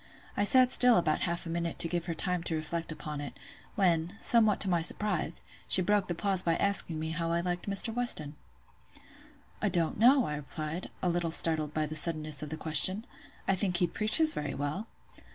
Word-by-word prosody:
I 205 - -1
sat 255 +3 +4
still 245 -2 +4
about 155 -3 -1
half 170 +1 -5
a - - -8
minute 170 0 -5
to - - +3
give 170 0 -5
her 170 - -5
time 180 +1 -1
to 165 - -3
reflect 165 +1 -6
upon 150 -1 -8
it; 145 - -10 0.4
when, 175 +1 -1
somewhat 220 -4 +3
to 200 - +4
my 175 -3 -1
surprise, 180 -1 -1 0.2
she 185 - +3
broke 205 +1 -1
the 175 - -4
pause 195 +1 -1
by 165 -2 -1
asking 195 -5 +2
me 160 0 -5
how 165 +1 -4
I 170 - -1
liked 175 +2 -5
Mr. 200 +3 +3
Weston? 190 -12 0 1.3
"I 210 - -1
don't 175 0 -2
know," 255 +3 +3
I 150 - -6
replied, 155 +3 -8
a 180 - 0
little 175 -1 -3
startled 160 -2 +5
by 155 -1 -1
the 155 +1 -8
suddenness 155 -3 +1
of 150 - -8
the 155 - -7
question; 165 +8 +4 0.4
"I 195 - +1
think 185 -2 -2
he 180 - +1
preaches 215 - +3
very 150 -2 -6
well." 145 +10 -6
170 Hz, 205 wpm, -28 LUFS, 155-200 Hz, 1.3 s, startled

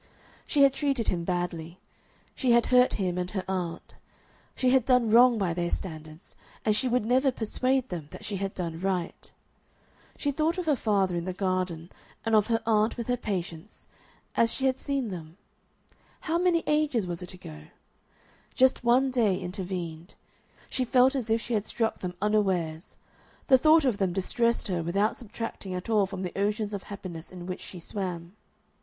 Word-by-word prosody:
She 285 -2 +4
had 275 -1 +6
treated 275 -5 0
him 170 -2 -1
badly; 175 -2 -3 0.6
she 250 -3 +2
had 235 0 +4
hurt 250 0 +6
him 180 -3 -1
and 180 0 -2
her 190 -2 -4
aunt; 180 -3 -4 0.6
she 255 -1 +2
had 260 -2 +4
done 250 -3 +3
wrong 240 +1 +7
by 190 -5 0
their 175 0 -1
standards, 155 -3 -6 0.3
and 215 -1 +3
she 235 +5 +1
would 245 -3 +1
never 260 +3 +3
persuade 255 +3 0
them 165 -5 -5
that - - -10
she 205 - -3
had 195 0 -3
done 165 -3 -4
right. 185 -2 -3 0.9
She 285 - 0
thought 315 +5 0
of 360 - -2
her 300 -2 +3
father 200 -6 +1
in 170 0 -2
the 185 - -3
garden, 185 -3 -2 0.3
and 225 - 0
of 215 -1 +5
her 225 -1 0
aunt 220 +1 +2
with 235 - -3
her 245 - +3
Patience, 185 -4 -5 0.5
as 230 0 +3
she 270 - -2
had 260 0 +1
seen 275 -5 -2
them 165 -1 -8 0.8
how 330 +2 0
many 350 -2 +2
ages 300 -8 +1
was 175 0 -4
it 180 0 -7
ago? 75 - -11 0.9
Just 260 -1 +3
one 255 +3 +4
day 220 -7 +2
intervened. 180 -2 -5 0.5
She 260 - -1
felt 255 +2 +4
as 250 -5 -3
if 225 +1 +3
she 240 - -4
had 210 -2 0
struck 225 -1 -1
them 180 -1 -5
unawares. 190 -6 0 0.5
The 260 -1 +7
thought 310 +1 +5
of 240 -6 +1
them 190 -3 +1
distressed 235 +5 0
her 180 -3 -1
without 200 +6 +1
subtracting 225 -4 -6
at 180 +5 -4
all 210 -3 +3
from 190 -1 -6
the 180 - -5
oceans 210 +1 -1
of 200 - -3
happiness 180 -5 -7
in 180 -1 -8
which 185 0 -5
she 180 - -9
swam. 175 0 -5
205 Hz, 185 wpm, -28 LUFS, 180-245 Hz, 0.9 s, wrong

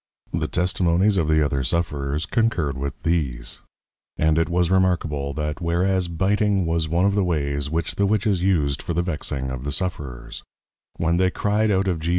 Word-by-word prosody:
The - - 0
Testimonies 90 +2 +2
of 80 -3 +1
the 80 -1 +3
other 70 -1 0
Sufferers 75 +1 -1
concurred 90 - 0
with 70 +1 -5
these; 70 -8 -1 0.6
and 80 0 +3
it 80 - +1
was 90 0 +1
remarkable, 85 -7 +1
that 75 +1 -3
whereas 90 +2 +1
Biting 95 +2 +1
was 80 -1 0
one 85 +4 +2
of 100 - +3
the 100 -1 +2
ways 70 -4 -1
which 80 +1 -2
the 100 - +1
Witches 100 -3 +1
used 75 -7 +1
for 85 - -3
the 85 - +1
vexing 70 -6 -3
of 65 -1 -5
the 70 - -3
Sufferers; 70 -8 -4 0.6
when 85 +1 +1
they 95 0 +3
cry'd 105 +3 +1
out 95 -1 +2
of 90 -4 0
_G. 80 +2 -3
85 Hz, 180 wpm, -23 LUFS, 75-95 Hz, 0.6 s, the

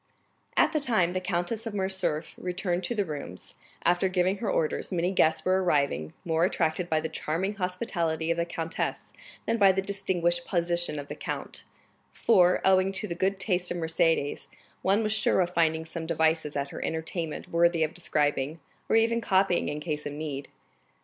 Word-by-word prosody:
30297m - - +7
At - - 0
the 305 - +2
time 220 - +2
the 185 - -1
Countess 180 +5 -2
of 215 - -5
Morcerf 190 -5 -1
returned 180 0 -2
to 240 - -2
the 205 -2 +1
rooms, 145 - -7 0.3
after 175 +2 +3
giving 185 +1 +1
her 210 +1 -2
orders, 155 +4 -1
many 180 0 +1
guests 160 -4 +2
were 185 +1 +3
arriving, 140 - +1
more 165 -1 +1
attracted 175 -1 0
by 155 - +2
the 160 - -2
charming 175 +7 -2
hospitality 180 -4 -1
of 170 - 0
the 170 - +2
countess 165 -1 -3 0.3
than 230 - +1
by 195 -2 +7
the 190 - -1
distinguished 185 -3 0
position 170 -3 0
of 145 0 -6
the - - -5
count; - - -5 0.5
for, 180 -5 +4
owing 190 0 +4
to 210 +2 -2
the 170 - -3
good 190 +3 0
taste 180 -3 +1
of 175 - -2
Mercédès, 160 -3 0 0.3
one 200 +4 +2
was 215 0 0
sure 215 -2 +2
of 180 -1 +1
finding 160 -2 +1
some 160 0 -6
devices 160 -2 +1
at 140 0 -2
her - - -5
entertainment 160 0 -3
worthy 170 -1 +3
of 155 - -1
describing, 150 -2 0 0.3
or - - +3
even 230 +1 +3
copying 190 -3 +2
in 150 +1 -3
case 150 -2 -3
of 145 - -5
need. 145 -2 -5
175 Hz, 185 wpm, -28 LUFS, 160-190 Hz, 0.5 s, 30297m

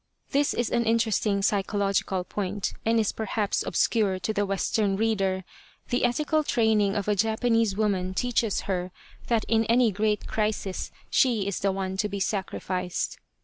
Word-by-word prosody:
This 285 +1 +2
is 240 - -1
an 235 0 +1
interesting 220 -3 +1
psychological 195 -2 0
point, 200 +1 -3
and 230 0 +4
is 215 - +1
perhaps 215 -1 -1
obscure 205 -5 +1
to 220 - -1
the 205 -1 0
Western 195 +1 0
reader. 195 -4 0 0.5
The 245 0 +2
ethical 300 +5 +1
training 220 -6 +2
of 205 -1 -2
a 210 - +2
Japanese 225 0 +1
woman 190 -4 0
teaches 235 -2 0
her 185 -2 -3 0.4
that 230 -3 +1
in 225 -1 +3
any 235 0 +4
great 210 +1 0
crisis 210 -3 -2 0.2
she 235 -6 +3
is 200 -2 -2
the 195 - +1
one 190 0 -3
to 210 +1 0
be 200 0 -4
sacrificed. 185 -2 -2
210 Hz, 155 wpm, -26 LUFS, 195-225 Hz, 0.5 s, and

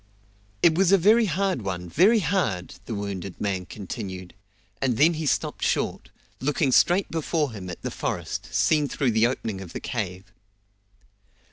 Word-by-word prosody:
"It 170 - +6
was 185 +2 +3
a 195 - +7
very 215 +6 +5
hard 190 -4 0
one 90 -3 -4
very 205 - +4
hard!" 140 - -1
the 115 - -4
wounded 100 -2 -5
man 95 -3 -2
continued, 95 -3 -7 0.5
and 125 -4 +1
then 160 +5 +5
he 155 -1 -3
stopped - - -1
short, - - -1 0.3
looking 140 +1 +1
straight 180 +9 +3
before 160 -3 -1
him 95 -4 -7
at 90 - -8
the - - -3
forest, - - -4
seen 150 -2 +2
through 135 -3 0
the 110 +1 +4
opening 110 -6 -4
of 90 -3 -9
the - - -4
cave. 95 -5 -5
125 Hz, 160 wpm, -25 LUFS, -, 0.5 s, a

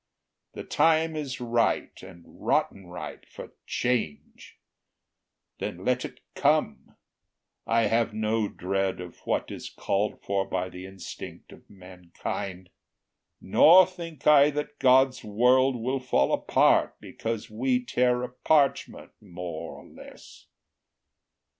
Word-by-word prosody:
The - - -7
time 160 0 +2
is 140 -4 -4
ripe, 120 -1 0
and 95 -2 -13
rotten 95 -2 -2
ripe, 90 -3 -8
for - - -11 0.2
change; 120 -12 -3 1.0
Then 90 +2 -5
let 125 0 +1
it - - -9
come: - - 0 0.7
I 115 0 +3
have 115 +2 +1
no 110 0 0
dread 95 0 -2
of 90 -2 -9
what - - -1
Is - - -7
called 100 +2 -2
for 100 -1 0
by 90 -1 -2
the 90 +1 -9
instinct 95 -1 -10
of - - -17
mankind; 90 0 -7 0.7
Nor 180 +4 +7
think 170 -4 -10
I 145 -1 +7
that 150 0 -5
God's 130 0 +4
world 125 +5 +3
will 130 +3 -2
fall 125 - +1
apart, - - +3
Because 115 0 -5
we 125 +2 0
tear 125 0 +1
a 125 - -4
parchment 140 +3 0
more 85 -2 -7
or - - -13
less. - - -15
115 Hz, 120 wpm, -26 LUFS, 95-130 Hz, 1.0 s, Nor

